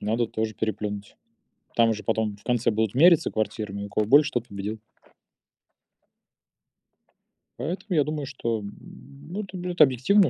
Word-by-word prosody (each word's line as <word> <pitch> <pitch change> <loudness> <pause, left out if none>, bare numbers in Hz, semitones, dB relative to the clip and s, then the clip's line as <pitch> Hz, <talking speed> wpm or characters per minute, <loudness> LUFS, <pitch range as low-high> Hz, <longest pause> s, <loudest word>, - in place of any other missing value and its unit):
Надо 115 +3 0
тоже 110 -1 -3
переплюнуть. 105 -1 -4 0.6
Там 115 -1 +4
же 105 - -7
потом 110 -2 0
в - - -23
конце 120 -2 +1
будут 110 +1 0
мериться 170 +3 +6
квартирами, 105 -2 -3
у 100 - -7
кого 105 0 0
больше- 145 +4 +6
тот 120 -1 -1
победил. 100 +2 -5 2.8
Поэтому 180 +5 -4
я 150 - +4
думаю, 150 -2 -4
что, 115 -4 -2
м, 100 0 -7 0.6
ну, 205 - -3
это 195 -2 -8
будет 180 0 -2
объективно, 145 - +5
115 Hz, 145 wpm, -26 LUFS, 105-145 Hz, 2.8 s, мериться